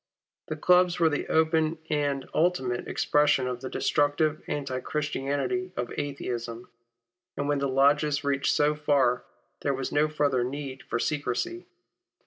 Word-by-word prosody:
The 155 - -3
clubs 180 +2 +4
were 165 -2 +5
the 145 - -2
open 160 0 +2
and 145 -3 0
ultimate 145 -8 0
expression 150 -3 +2
of 125 -1 -3
the 130 - -5
destructive, 145 +3 +1
anti 135 -3 -3
Christianity 150 +5 -2
of 120 - -3
Atheism; 120 -4 -4 0.7
and 140 - -1
when 145 -1 +1
the 140 - 0
lodges 145 +2 +3
reached 140 -1 +1
so 150 0 +3
far, 140 -5 +1 0.4
there 140 -1 0
was 130 0 -4
no 150 +1 +3
further 145 -4 +1
need 135 +1 -5
for - - -3
secrecy. 145 - -2
145 Hz, 140 wpm, -27 LUFS, 130-150 Hz, 0.7 s, were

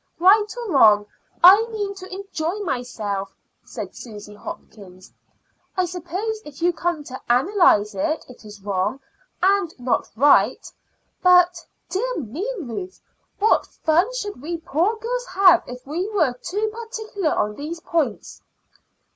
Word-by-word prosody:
"Right 405 +5 +5
or 470 -5 -4
wrong, 210 -6 +6 0.4
I 390 +5 +9
mean 415 -3 -3
to 380 -1 -11
enjoy 375 -2 -4
myself," 220 - -3 0.3
said - - -7
Susy 210 -3 -10
Hopkins. 190 -2 -11 0.6
"I 370 - +2
suppose, 365 +5 -4
if 290 -2 -12
you 350 +1 +2
come 340 -3 -2
to 260 -2 -9
analyse 250 - +4
it, 310 +11 -2
it 250 -3 -14
is 210 -2 -12
wrong, 200 +6 -1 0.4
and 390 -3 +3
not 245 0 0
right. 280 +5 +4 0.5
But, 360 -1 +5 0.2
dear - - -2
me, 320 - -4
Ruth! 360 +8 -6 0.4
what 430 +2 +3
fun 345 +8 +1
should 410 - -5
we 335 +4 -4
poor 335 +7 0
girls - - -3
have 370 -3 +5
if 250 0 -9
we 340 +8 -3
were 320 - +1
too 410 - -3
particular 440 -7 -3
on 210 - 0
these 305 +8 -6
points?" 315 -10 -2
340 Hz, 140 wpm, -22 LUFS, 250-400 Hz, 0.6 s, I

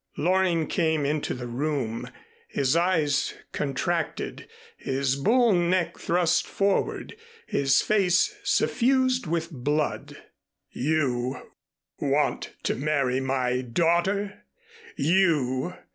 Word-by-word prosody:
Loring 175 0 +2
came 160 -3 0
into 150 +1 -1
the 125 -1 -6
room, 125 -2 -3 0.4
his 135 +2 0
eyes 165 -5 +1 0.2
contracted, 140 -3 -3 0.3
his 135 0 -1
bull 230 - +3
neck 175 -1 +1
thrust 175 -1 +1
forward, 200 - -1 0.3
his 135 - +2
face 195 - +2
suffused 260 - +2
with 165 +1 -2
blood. 145 +2 -2 0.5
"You 130 -3 -1 0.5
want - - 0
to - - +1
marry 135 -2 0
my 130 -1 0
daughter? 175 - 0 0.5
_You! 165 -4 +2
155 Hz, 95 wpm, -26 LUFS, 135-185 Hz, 0.5 s, bull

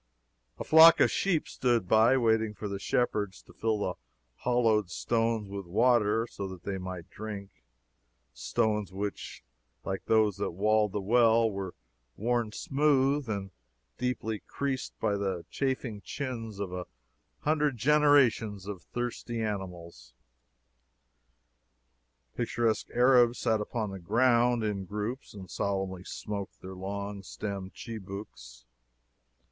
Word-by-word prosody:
A - - -4
flock 160 +1 +8
of - - +5
sheep 180 -6 +1
stood 120 -6 0
by, 110 +6 +5
waiting 110 -3 +2
for 105 - -5
the 100 -1 -4
shepherds 105 -4 0
to - - -18
fill 110 -1 0
the 95 -3 -1 0.4
hollowed 115 -5 +2
stones 115 +2 0
with 100 -2 -6
water, 115 +2 +3
so 100 -4 -6
that 95 -2 -9
they 95 -1 -3
might 90 -2 -7
drink 105 -2 -7 0.8
stones 105 - -1
which, 100 +2 -5 0.4
like 95 0 -3
those 110 -3 +3
that 100 - -2
walled 105 +2 +2
the 105 - -1
well, 115 +1 +4
were 95 -2 -5 0.4
worn 120 0 0
smooth 140 0 +1
and 100 -2 -3 0.5
deeply 115 -3 -2
creased 135 -2 -3
by 100 - +1
the 95 -4 -2
chafing 130 -6 -2
chins 115 -5 -5
of 100 -3 -4
a 90 -1 -5 0.5
hundred 150 -3 +1
generations 130 -7 +3
of 100 -3 -6
thirsty 120 -1 -4
animals. 90 - -5 2.2
Picturesque 115 -1 0
Arabs 125 -1 +5
sat 110 -1 +1
upon 105 -1 -3
the 95 - -7
ground, 120 +4 +3
in 100 -3 -2
groups, 105 +6 -5
and 95 -2 -10
solemnly 95 -2 -2
smoked 100 0 -6
their 95 +1 -8
long 100 +2 -5
stemmed 100 -1 -6
chibouks. 95 - -9
105 Hz, 125 wpm, -29 LUFS, 100-120 Hz, 2.2 s, flock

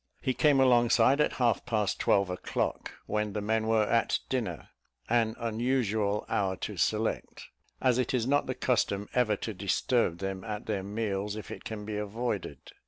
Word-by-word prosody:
He 130 - 0
came 145 0 +4
alongside 125 +1 +5
at - - +2
half 120 -4 +1
past 105 -5 -1
twelve 100 -2 +2
o'clock, 90 - -2
when 105 -1 -1
the 105 - -2
men 110 +1 0
were 110 -1 +3
at 115 +2 +2
dinner, 110 -11 -3 0.4
an 115 -1 +2
unusual 110 -3 0
hour 95 -2 0
to - - -5
select, - - -1 0.3
as 130 -1 +2
it 125 - 0
is 125 -3 +1
not 145 +3 +2
the 130 - -2
custom 105 -5 0
ever 120 -4 +2
to 110 +2 -5
disturb 100 0 +1
them 95 0 -4
at 105 +1 -5
their 105 -3 -1
meals 100 0 -2
if 110 - -8
it - - -8
can 105 -2 -5
be 105 -1 -4
avoided. 105 - -4
110 Hz, 170 wpm, -29 LUFS, 100-120 Hz, 0.4 s, alongside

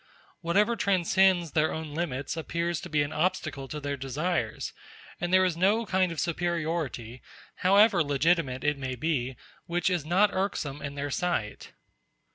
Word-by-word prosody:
Whatever 205 +7 +2
transcends 190 -3 +3
their 155 +1 +2
own 160 -2 -5
limits 145 -4 -3
appears 170 +1 -2
to - - -8
be 150 -1 +2
an 145 +2 -5
obstacle 155 -4 -1
to 150 - -5
their 145 -1 -3
desires, 135 -2 -2 0.5
and 175 0 -2
there 185 0 +5
is 180 -3 0
no 205 +6 +2
kind 185 -3 +1
of 165 - -5
superiority, 165 -8 -2 0.4
however 200 -1 +5
legitimate 145 -2 +1
it 145 -1 +1
may 130 -1 -3
be, 130 -2 -1 0.3
which 175 +2 0
is 175 -4 0
not 185 +6 +3
irksome 150 -7 -2
in 140 0 -5
their 145 0 -3
sight. 130 -11 -2
165 Hz, 155 wpm, -28 LUFS, 145-180 Hz, 0.5 s, there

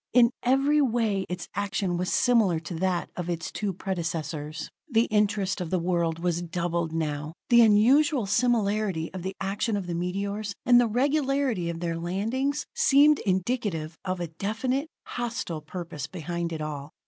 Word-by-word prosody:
In 240 0 +6
every 275 +4 +3
way 225 -7 +1
its 180 0 -4
action 195 -2 -1
was 180 +1 -1
similar 220 -9 +3
to 170 - -7
that 180 +1 -1
of 175 -1 -4
its 165 -2 -3
two 205 -2 -2
predecessors. 160 -5 -4 0.2
The 230 -3 +4
interest 205 -2 +1
of 175 - -3
the 185 - +1
world 170 -2 0
was 175 0 -1
doubled 170 -1 -2
now. 150 -1 -3 0.2
The 235 0 +8
unusual 245 +5 +5
similarity 210 -6 +1
of 185 - -5
the 190 +2 -4
action 205 +3 -1
of 195 - -4
the 175 - -4
meteors, 200 +4 -3
and 245 0 +7
the 240 - +2
regularity 270 - +1
of 165 0 -5
their 165 -1 -2
landings, 230 - -1
seemed 300 - +5
indicative 185 -5 -1
of 185 -1 -2
a 170 -2 -3
definite, 230 - -2 0.2
hostile 235 -9 -4
purpose 155 -2 -6
behind 170 0 -4
it 160 -1 -4
all. 145 -2 -5
190 Hz, 160 wpm, -27 LUFS, 170-235 Hz, 0.2 s, The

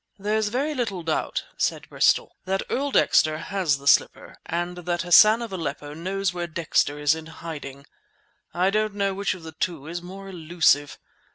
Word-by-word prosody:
"There's 210 +2 0
very 270 +8 -1
little 210 - -3
doubt," 160 -1 -1
said - - -1
Bristol, - - +2
"that 190 +1 -1
Earl 280 +2 0
Dexter 155 - +3
has 175 -4 0
the 140 - -15
slipper 140 - +2
and 175 +1 -3
that 175 0 -2
Hassan 215 +6 +6
of 225 -4 -7
Aleppo 150 -4 -4
knows 185 +3 -2
where 175 -1 -3
Dexter 155 -3 0
is 145 0 +3
in 160 0 -7
hiding. 145 -4 -8 0.7
I 185 +2 +1
don't 215 0 0
know 200 -1 0
which 200 0 -1
of 180 - -13
the 160 - -8
two 160 -2 -3
is 170 +2 -5
more 195 +2 -10
elusive. 165 -5 +1
175 Hz, 175 wpm, -24 LUFS, 160-195 Hz, 0.7 s, Hassan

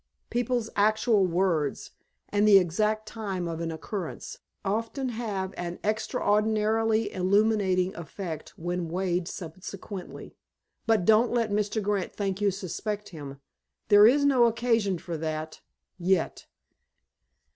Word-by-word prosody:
People's 240 -1 -1
actual 215 -1 +3
words, 170 -5 0 0.4
and 205 +1 +2
the 205 -2 +9
exact 210 +5 +1
time 195 -6 -4
of 165 0 -4
an 165 -1 -2
occurrence, 170 +2 -6 0.3
often 230 +6 -1
have 205 -5 -3
an 175 0 -4
extraordinarily 215 0 +1
illuminating 190 -1 +2
effect 170 -1 -7
when 175 0 -3
weighed 180 0 -1
subsequently. 185 +2 -8 0.5
But 220 -6 +3
don't 220 +3 +5
let 230 -3 0
Mr. 210 +1 0
Grant 200 -2 -1
think 195 -1 -2
you 205 - +4
suspect 205 +2 -4
him. 140 -5 -9 0.5
There 205 0 +8
is 280 +4 +4
no 260 -4 +5
occasion 230 -4 +1
for 170 -1 -5
that—yet." 160 +3 -3
200 Hz, 115 wpm, -27 LUFS, 180-220 Hz, 0.5 s, the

